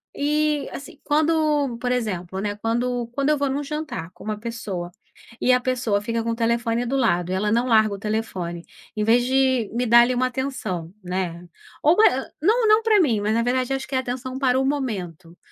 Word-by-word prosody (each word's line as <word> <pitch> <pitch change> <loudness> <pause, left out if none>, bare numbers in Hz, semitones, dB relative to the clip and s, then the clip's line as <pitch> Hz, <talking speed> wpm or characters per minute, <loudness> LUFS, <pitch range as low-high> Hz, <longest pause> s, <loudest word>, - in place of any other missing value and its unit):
E 300 0 0
assim 285 +1 -9
quando 300 -4 +1
por 250 0 -1
exemplo, 190 -6 -2
né, 205 0 -2
quando 240 +2 -1
quando 275 +4 -1
eu 300 - +3
vou 280 -1 0
num 285 +2 -2
jantar 300 - -5
com - - -15
uma 215 -1 -3
pessoa 205 -7 -5 0.5
e 255 - +4
a 250 - +3
pessoa 240 -5 0
fica 230 +1 -2
com 230 - -1
o - - -2
telefone 235 +1 0
do 270 +3 -1
lado 180 -8 +1
e - - 0
ela 210 +2 0
não 240 +3 +2
larga 215 -2 +4
o - - -5
telefone 190 -6 -3 0.3
em 210 - +1
vez 240 +2 +4
de 260 -3 +2
me 245 +1 0
dar 235 +1 +7
ali 250 +1 +2
uma 255 +1 +1
atenção, 245 -10 -4
né. 175 -1 -4 0.3
Ou 315 +4 +5
mai 440 - +7
hã, 265 - -4
não, 445 +6 +3
não 430 +1 +5
pra 435 -3 +4
mim 235 - +2
mas 210 +1 0
na 230 - +2
verdade 255 +2 0
acho 270 - -3
que 265 - -4
é - - +3
atenção 255 0 -4
para 260 -1 +2
o 265 - +1
momento, 190 - -4
245 Hz, 215 wpm, -23 LUFS, 210-270 Hz, 0.5 s, dar